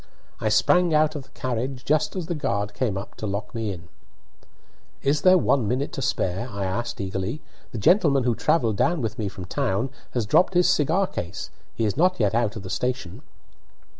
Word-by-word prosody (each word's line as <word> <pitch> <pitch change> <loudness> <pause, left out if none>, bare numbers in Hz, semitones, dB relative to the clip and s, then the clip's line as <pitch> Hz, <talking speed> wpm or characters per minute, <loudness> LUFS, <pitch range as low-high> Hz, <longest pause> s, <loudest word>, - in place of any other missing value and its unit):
I 110 - 0
sprang 170 +10 +4
out 155 0 +3
of 140 -3 -6
the - - -24
carriage 130 +1 -3
just 155 +2 +1
as 185 -3 -3
the 170 - -2
guard 105 -9 -2
came 105 -2 -1
up 100 - -7
to 110 - -4
lock 100 +1 -4
me 115 -3 -2
in. 85 -3 -9 1.2
"Is 145 +2 +2
there 185 0 +6
one 135 - +2
minute 130 +6 -1
to 150 - -5
spare?" 95 0 -1
I 100 -3 -3
asked, 115 +6 -3
eagerly. 95 +7 -3 0.3
"The - - -5
gentleman 140 - +4
who 120 -1 +2
travelled 115 -4 +1
down 170 +4 +2
with 110 -1 -3
me 105 - -1
from 95 -1 -7
town 100 +7 -1 0.2
has 120 -3 +1
dropped 180 - +3
his 180 0 +5
cigar 175 +2 +3
case; 85 - -6 0.2
he 115 - 0
is 105 - -1
not 180 +3 +3
yet 105 -3 +2
out 115 -1 +1
of 110 - -7
the 95 - -7
station." 125 -1 -3
120 Hz, 200 wpm, -24 LUFS, 100-150 Hz, 1.2 s, there